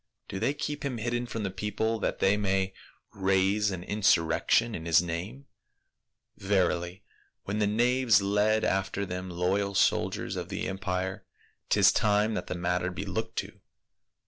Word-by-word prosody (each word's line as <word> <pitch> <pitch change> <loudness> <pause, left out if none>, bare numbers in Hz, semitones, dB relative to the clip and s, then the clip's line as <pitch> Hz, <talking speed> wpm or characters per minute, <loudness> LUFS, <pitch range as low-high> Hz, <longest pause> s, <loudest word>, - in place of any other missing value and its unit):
" - - -54
Do 95 - -4
they 125 +7 0
keep 145 0 -4
him 135 -4 -2
hidden 120 +2 -2
from 115 -2 -4
the 95 - -2
people 105 +3 -2
that - - -1
they 95 +1 +3
may 95 -2 0 0.4
raise 95 +2 +2
an 95 -3 -5
insur 95 -4 +3
rection 115 +7 +2
in 80 0 -6
his 80 -2 +6
name? 90 +11 -4 0.9
Verily 90 -1 0 0.4
when 105 +2 -3
the 105 - +2
knaves 120 0 +3
lead 105 +2 +2
after 95 +1 0
them 90 0 -5
loyal 95 +3 -1
soldiers - - +1
of - - -5
the - - -3
empire, 95 0 -3 0.4
'tis - - +5
time 105 +1 +2
that - - -4
the - - -3
matter 90 +1 -1
be 90 +2 -5
looked 110 +4 -4
to. - - -4
100 Hz, 165 wpm, -28 LUFS, 95-110 Hz, 0.9 s, his